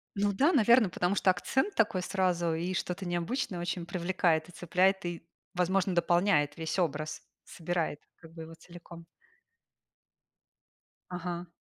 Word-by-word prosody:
Ну 200 Hz, 0 st, +1 dB
да, 290 Hz, -, +3 dB
наверно, 235 Hz, -4 st, +5 dB
потому 180 Hz, +3 st, 0 dB
что 190 Hz, -, +2 dB
акцент 265 Hz, -, 0 dB
такой 205 Hz, -4 st, +2 dB
сразу 180 Hz, -3 st, 0 dB
и 175 Hz, +3 st, -2 dB
что-то 185 Hz, +1 st, -3 dB
необычное 175 Hz, +3 st, -2 dB
очень 175 Hz, 0 st, -3 dB
привлекает 175 Hz, -2 st, 0 dB
и -, -, -11 dB
цепляет, 185 Hz, +2 st, +1 dB
и, 175 Hz, -1 st, -5 dB, 0.3 s
возможно, 185 Hz, +1 st, +1 dB
дополняет 170 Hz, -4 st, +2 dB
весь 160 Hz, +3 st, -2 dB
образ. 155 Hz, -3 st, -2 dB, 0.2 s
Собирает, 165 Hz, -3 st, -3 dB, 0.2 s
как 165 Hz, -1 st, -16 dB
бы, 165 Hz, -1 st, -8 dB
его 165 Hz, +1 st, -11 dB
целиком. 170 Hz, 0 st, -13 dB, 2.1 s
Ага. 175 Hz, 0 st, -5 dB
175 Hz, 135 wpm, -30 LUFS, 170-190 Hz, 2.1 s, наверно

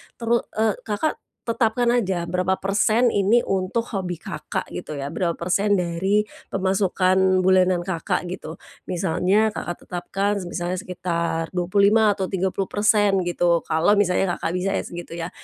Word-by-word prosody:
Teru 235 Hz, 0 st, +1 dB, 0.2 s
eee, 220 Hz, -1 st, +2 dB
Kakak 220 Hz, +9 st, -1 dB, 0.3 s
tetapkan 235 Hz, +1 st, +1 dB
aja 190 Hz, -8 st, 0 dB
berapa 180 Hz, +2 st, 0 dB
persen 215 Hz, +5 st, +2 dB
ini 205 Hz, +4 st, +3 dB
untuk 195 Hz, +5 st, -1 dB
hobi 180 Hz, -3 st, -3 dB
Kakak -, -, -5 dB
gitu 150 Hz, -, -6 dB
ya, 140 Hz, +1 st, -5 dB
berapa 170 Hz, -3 st, -1 dB
persen 200 Hz, +4 st, +1 dB
dari 185 Hz, +4 st, +1 dB, 0.2 s
pemasukan 190 Hz, -1 st, +2 dB
bulanan 185 Hz, -2 st, +3 dB
Kakak 180 Hz, +1 st, -2 dB
gitu. 175 Hz, -2 st, -7 dB, 0.3 s
Misalnya 185 Hz, +5 st, +1 dB
Kakak 175 Hz, -3 st, -6 dB
tetapkan, 195 Hz, +3 st, -2 dB
semisalnya 175 Hz, 0 st, -3 dB
sekitar 170 Hz, -2 st, -3 dB
25% 200 Hz, +4 st, +3 dB
atau 190 Hz, -, -1 dB
30% 195 Hz, +2 st, +1 dB
gitu 175 Hz, -1 st, +1 dB
kalau 160 Hz, +7 st, +2 dB
misalnya 195 Hz, -2 st, +2 dB
Kakak -, -, -2 dB
bisa 195 Hz, +2 st, -1 dB
ya -, -, 0 dB
segitu 175 Hz, -1 st, -8 dB
ya. 170 Hz, 0 st, -4 dB
190 Hz, 140 wpm, -23 LUFS, 175-205 Hz, 0.3 s, ini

